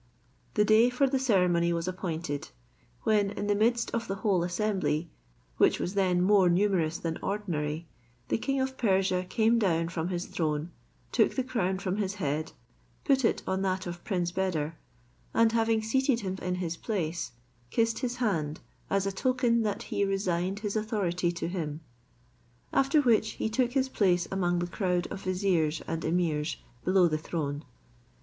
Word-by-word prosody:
The 210 - +4
day 220 +3 +6
for 250 +3 +2
the 270 0 +1
ceremony 180 -8 +3
was 170 +1 -2
appointed, 165 -6 -3 0.5
when 205 -2 +3
in 205 0 -4
the 205 - +2
midst 235 +3 +1
of 230 0 -2
the 195 - -2
whole 190 -4 +3
assembly, 180 -3 -1 0.5
which - - +4
was 180 - -2
then 185 -3 +2
more 195 -2 +5
numerous 175 -3 +2
than 165 -1 -3
ordinary, 165 -6 -2 0.4
the - - +1
king 275 +3 -1
of 265 0 -2
Persia 190 -4 +2
came 225 +3 +3
down 165 -5 +1
from 165 -1 -2
his 180 -1 -2
throne, 155 0 -2 0.4
took - - +3
the 260 - +1
crown 195 -7 -1
from 190 0 -2
his 200 -1 -1
head, 155 -4 -2 0.5
put 270 -2 +3
it 225 - +1
on 190 0 -1
that 185 -1 -1
of 175 -1 -6
Prince 175 -4 -1
Beder, 165 -4 -1 0.6
and 230 -1 +5
having 225 -1 +2
seated 265 +2 +1
him 190 -2 -3
in 180 0 -1
his 170 -2 -3
place, 170 - -3 0.4
kissed 230 - +1
his 245 -1 -2
hand 165 -11 -1 0.3
as 195 0 +1
a 195 - 0
token 240 +2 +1
that 210 -2 -1
he - - -1
resigned 195 0 -1
his 210 -1 -3
authority 190 -5 0
to 170 - -3
him. 160 -4 -3 0.9
After 275 +3 +4
which 220 -4 +3
he - - -2
took 245 +1 +1
his 265 -1 +2
place 180 -8 +2
among 175 -2 +1
the 175 - 0
crowd 180 -1 -1
of 195 - -5
viziers 180 -5 +1
and 165 0 -2
emirs 160 -2 0 0.3
below 185 -1 +4
the 155 -2 -1
throne. 150 -2 -3
190 Hz, 170 wpm, -29 LUFS, 170-220 Hz, 0.9 s, day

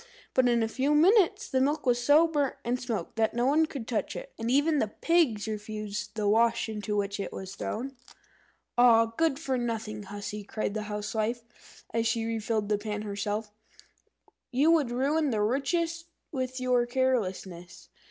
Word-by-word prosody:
But 255 -1 +4
in 235 -1 +3
a - - +1
few 270 +6 +1
minutes 400 +6 +4
the 260 -2 +1
milk 295 +3 0
was 245 -1 +2
so 300 +5 +6
burnt 290 -4 0
and 245 +1 -1
smoked 225 -6 -4
that 225 0 +1
no 240 +1 +1
one 310 +4 +3
could 265 -7 -7
touch 225 -4 -2
it, - - -8
and 225 - -2
even 290 +4 +3
the 220 - +1
pigs 245 -4 +1
refused 210 0 -5
the 210 -2 -1
wash 230 +3 +3
into 210 -1 -3
which 200 0 -2
it 200 - -4
was 190 0 -7
thrown. 265 +7 -4 0.8
"Ah, 230 -2 +7
good 325 -2 +2
for 270 -5 -1
nothing 220 -3 -3
hussy!" 205 +1 -6
cried 205 0 -3
the 215 -1 -4
Housewife, 220 +3 -4
as 230 0 +1
she 230 0 0
refilled 220 -1 -1
the 210 -1 +1
pan 210 0 -4
herself, 205 +1 -3 1.0
"you 280 +5 +3
would 305 -7 +3
ruin 285 +5 +1
the 215 -4 0
richest 330 +8 -1 0.2
with 255 -2 -3
your 250 -1 +2
carelessness. 195 -9 -2
235 Hz, 170 wpm, -28 LUFS, 210-275 Hz, 1.0 s, Ah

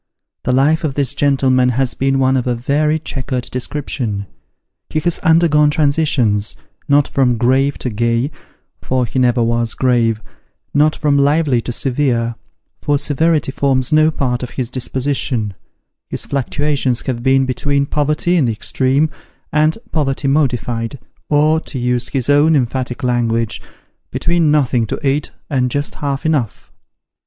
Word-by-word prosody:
The 125 - +1
life 145 +6 +2
of 145 -4 -2
this 140 -1 0
gentleman 135 -3 +2
has 125 +1 0
been 135 0 0
one 130 0 +2
of 125 -1 -1
a 125 - +1
very 150 +6 +1
chequered 130 -4 -4
description: 125 -6 -3 0.6
he 155 - -1
has 175 +2 0
undergone 160 -3 +4
transitions 140 -9 +1 0.3
not 145 -1 +3
from 125 -3 +1
grave 135 +4 +2
to 125 - -4
gay, 115 +5 0 0.5
for 130 -1 0
he 125 +3 -2
never 120 -1 +3
was 115 0 0
grave 120 -4 +1 0.5
not 150 +2 +3
from 145 -2 +1
lively 140 -3 +2
to 120 - -5
severe, 120 -2 0 0.5
for 145 0 +1
severity 150 +1 +1
forms 135 0 0
no 155 +1 +5
part 125 -5 -2
of 125 - -5
his 125 -2 -4
disposition; 130 -4 -2 0.6
his - - -3
fluctuations 140 -2 -1
have 120 -3 -2
been 135 +1 +3
between 140 +2 0
poverty 150 +5 0
in 150 - +3
the 115 - 0
extreme, 130 +7 +2 0.5
and 155 +3 +2
poverty 135 -3 -1
modified, 125 -4 0 0.3
or, 155 +2 +3
to 145 - -8
use 125 0 0
his 130 -4 -1
own 145 +3 +4
emphatic 130 0 -2
language, 115 -2 0 0.2
" - - -47
between 170 -2 +1
nothing 130 -6 +2
to 140 - -3
eat 140 +2 0 0.2
and 130 -3 0
just 145 +3 -2
half 140 +1 -2
enough." 145 -9 -1
135 Hz, 150 wpm, -17 LUFS, 125-145 Hz, 0.6 s, no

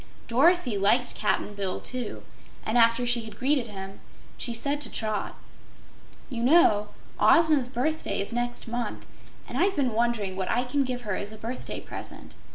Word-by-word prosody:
Dorothy 260 - +3
liked 235 +6 +3
Cap'n 210 0 -1
Bill, 195 -2 -3
too, 250 -3 -4 0.4
and 220 - -1
after 230 +1 +4
she 240 -1 +3
had 220 -2 -10
greeted 265 -2 +1
him, 195 -2 -8 0.4
she 240 - -1
said 280 +5 -1
to - - +1
Trot: 215 -2 -2 0.9
"You 240 -4 -5
know, 235 -7 +5 0.3
Ozma's 310 -6 +5
birthday 280 +6 -2
is 200 +4 -2
next 240 0 -2
month, 240 +1 -4 0.4
and - - -4
I've 390 +2 +2
been 260 -6 0
wondering 220 -4 0
what 190 -1 -3
I 245 +2 +2
can 275 +3 0
give 250 -2 -4
here 210 - -4
as 200 +2 -3
a 215 - -10
birthday 230 +4 -5
present. - - -9
240 Hz, 165 wpm, -27 LUFS, 215-260 Hz, 0.9 s, know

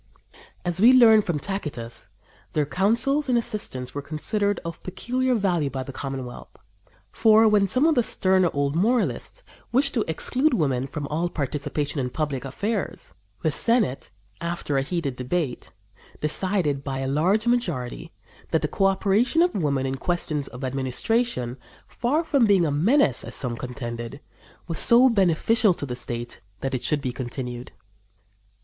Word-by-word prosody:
As 175 +1 -1
we 240 +4 +8
learn 225 -4 +7
from 175 -6 -2
Tacitus, 145 -10 -5 0.4
their 150 -1 +1
counsels 235 - +1
and 245 - +3
assistance 210 - -4
were 145 - -4
considered 200 +8 -1
of 170 - -6
peculiar 250 +7 -1
value 180 -9 +1
by 130 0 -4
the 135 - -9
Commonwealth. 135 -3 -7 0.5
For, 220 0 +5
when 205 -2 +4
some 255 - +3
of 325 - +5
the 250 - +3
sterner 185 -5 +2
old 140 0 -1
moralists 240 - 0 0.3
wished 275 +3 +2
to 225 - +1
exclude 255 - +1
women 135 - 0
from 145 +1 -5
all 165 +4 -1
participation 145 0 -3
in 125 -2 -1
public 145 -1 -3
affairs, 200 - -3 0.3
the 155 - +2
Senate, 220 - +1 0.3
after 170 -4 -3
a 135 - +3
heated 140 -2 -2
debate, 130 +2 -3 0.5
decided 150 -3 -1
by 135 -1 -3
a 135 - -2
large 180 - +2
majority 170 - -1 0.4
that 160 - +1
the - - +2
coöperation 195 - +2
of 355 - -2
women 140 -7 0
in 135 0 -2
questions 155 -3 -2
of 125 +1 -9
administration, 130 - -1 0.3
far 280 +7 0
from 280 -7 +3
being 195 -4 +4
a 150 - 0
menace, 165 - +3
as 115 - -5
some 125 -3 0
contended, 120 0 -6 0.5
was 165 -2 -1
so 245 +3 +6
beneficial 200 0 +3
to 145 - -5
the 125 -3 -4
state 120 -1 -5 0.2
that 135 0 -2
it 130 - -1
should 150 -1 +1
be 130 -2 -2
continued. 125 -1 -5
165 Hz, 155 wpm, -24 LUFS, 135-220 Hz, 0.5 s, we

